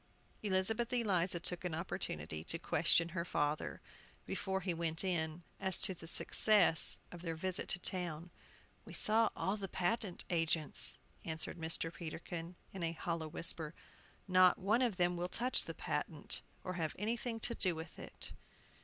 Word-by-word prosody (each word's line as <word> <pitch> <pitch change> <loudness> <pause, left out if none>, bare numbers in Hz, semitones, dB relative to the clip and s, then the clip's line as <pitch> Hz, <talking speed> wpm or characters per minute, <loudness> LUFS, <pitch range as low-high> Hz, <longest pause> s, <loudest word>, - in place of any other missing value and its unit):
Elizabeth 215 +4 +1
Eliza 190 -8 +2
took 175 +1 +1
an 175 -3 -1
opportunity 80 - -3
to 165 - 0
question 165 0 +3
her 170 0 -2
father, 150 -3 -1 0.4
before 190 0 -2
he 180 -2 0
went 165 0 +2
in, 170 -2 -1 0.2
as 190 -1 +2
to 190 - +3
the 165 -2 -10
success 180 -1 +4
of 175 - -8
their 165 -2 -3
visit 185 +2 0
to - - +3
town. 175 -2 -1 0.5
"We - - -10
saw 225 +1 +4
all 195 +3 0
the 195 -2 -4
patent 185 +1 0
agents," 165 -3 +1 0.3
answered 160 +1 -2
Mr. 165 0 -2
Peterkin, 170 +1 -6 0.2
in 190 - -5
a 165 -1 0
hollow 165 -1 -2
whisper. 165 -1 -4 0.5
"Not 185 -1 +6
one 210 +6 +2
of 240 -6 +2
them 175 -1 +2
will 175 +1 -2
touch 250 +6 +1
the - - -6
patent, - - -2 0.2
or 185 - -3
have 160 -4 -2
anything 230 +3 -1
to 235 - +3
do 185 -6 +1
with 160 +1 -8
it." - - -7
175 Hz, 160 wpm, -36 LUFS, 165-190 Hz, 0.5 s, Not